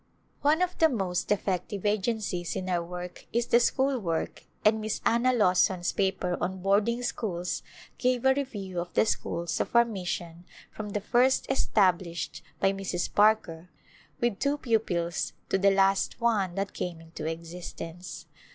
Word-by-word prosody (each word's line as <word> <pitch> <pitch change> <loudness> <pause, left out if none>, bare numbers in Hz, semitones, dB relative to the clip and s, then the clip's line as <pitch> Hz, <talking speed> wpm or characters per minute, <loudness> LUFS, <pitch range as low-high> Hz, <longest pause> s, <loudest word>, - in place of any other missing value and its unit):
One 310 +5 +3
of 365 0 -2
the 320 -2 +6
most 190 - -1
effective 195 0 -1
agencies 205 - -1
in 185 0 -3
our 175 -2 +1
work 180 +1 -8
is 235 +1 +1
the 235 - +5
school 265 +2 +2
work 165 -6 -3 0.2
and 215 +1 +4
Miss 215 0 -2
Anna 235 +2 +3
Lawson's 185 -5 +3
paper 190 -2 0
on 185 +1 -3
boarding 215 +5 +2
schools 180 -7 -2 0.4
gave 250 0 +1
a 265 - +6
review 205 -10 -4
of 175 0 -4
the - - +5
schools 170 -6 -2
of - - -2
our 235 0 +7
mission 175 -5 -5 0.3
from 215 -1 -6
the 205 0 -2
first 250 +5 +3
established 180 -8 +1 0.2
by 195 - +3
Mrs. 190 -3 -3
Parker 195 -5 +3 0.5
with 235 -4 0
two 285 +1 +1
pupils 185 -10 0 0.2
to 195 - +2
the 200 +1 +5
last 195 +2 +2
one 210 -7 +1
that 195 0 -2
came 175 -2 -4
into 165 -1 -7
existence. 165 +1 -7
195 Hz, 155 wpm, -28 LUFS, 175-230 Hz, 0.5 s, our